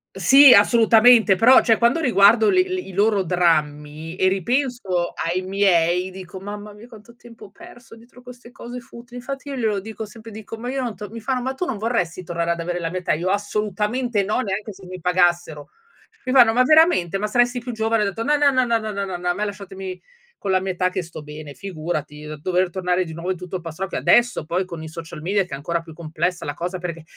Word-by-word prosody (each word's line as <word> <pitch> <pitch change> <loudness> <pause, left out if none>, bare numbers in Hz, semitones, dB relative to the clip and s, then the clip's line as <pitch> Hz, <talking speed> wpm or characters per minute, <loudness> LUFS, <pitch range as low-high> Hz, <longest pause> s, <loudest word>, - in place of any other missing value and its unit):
Sì, 275 -1 +7
assolutamente, 225 0 +5
però, 240 +7 +6
cioè 225 -2 +3
quando 235 +7 +3
riguardo 220 -5 +4
le 370 - +4
l 370 0 -3
i 365 - -7
loro 205 0 +2
drammi 155 -2 -1
e 185 - +2
ripenso 195 - -1
ai 175 +2 -1
miei, 185 -2 +1
dico: 185 0 -10
"Mamma 205 +2 -8
mia 210 +3 -14
quanto 230 0 -16
tempo 235 -2 -15
ho 195 - -14
perso 240 +3 -15
dietro 235 +2 -18
queste 245 -1 -13
cose 245 +1 -9
futili". 240 +1 -14
Infatti 275 +2 -7
io 275 - -4
glielo 220 -5 -1
dico 220 +2 -7
sempre, 225 +1 -13
dico: 220 +1 -9
"Ma 245 +2 -6
io 265 0 -2
non 235 -4 -4
to" 210 -1 -8
mi 230 +2 -8
fanno: 255 +3 -2
"Ma 260 +2 -3
tu 360 - -3
non 250 - -4
vorresti 185 -6 -2
tornare 170 0 -2
ad 170 - -2
avere 175 +1 -3
la 165 -1 -3
mia 185 - -3
età?" 180 - -1
Io: 175 +4 -2
"Assolutamente 210 +3 -1
no, 210 +6 -1
neanche 205 0 -4
se 195 -1 -14
mi 185 0 -8
pagassero!" 175 -4 0 0.6
Mi 255 - -2
fanno: 240 -4 +6
"Ma 250 - +3
veramente? 265 - +4
Ma 205 - -2
saresti 245 +3 +1
più 245 +1 -6
giovane." 225 -1 0
Ho - - 0
detto: 200 +3 -3
"No, 295 +4 +2
no, 290 -1 +4
no, 255 -1 +2
no, 230 -1 +2
no, 220 -1 -5
no, 200 -1 -3
no, 185 -2 -5
no, 180 0 -6
a - - +2
me 210 +4 -3
lasciatemi 190 -2 -7 0.4
con 195 - -3
la 185 - +3
mia 190 0 -3
età 185 +1 0
che 185 - -3
sto 160 -2 -10
bene, 150 0 -10
figurati." 155 -3 -5
Dover 185 +1 0
tornare 180 0 -1
di 160 - -8
nuovo 170 +3 -4
in 185 - -3
tutto 180 +1 -8
il 180 - -4
pastrocchio, 175 +4 -5
adesso 240 -9 +2
poi 180 +3 -1
con 170 -3 -8
i - - -7
social 160 -1 -9
media 195 +3 +1
che 180 - -11
è - - -1
ancora 165 +5 -3
più 165 -1 -13
complessa 170 +3 -3
la 145 - -3
cosa 175 +4 -4
perché: 170 -2 -6
200 Hz, 235 wpm, -21 LUFS, 175-235 Hz, 0.6 s, Sì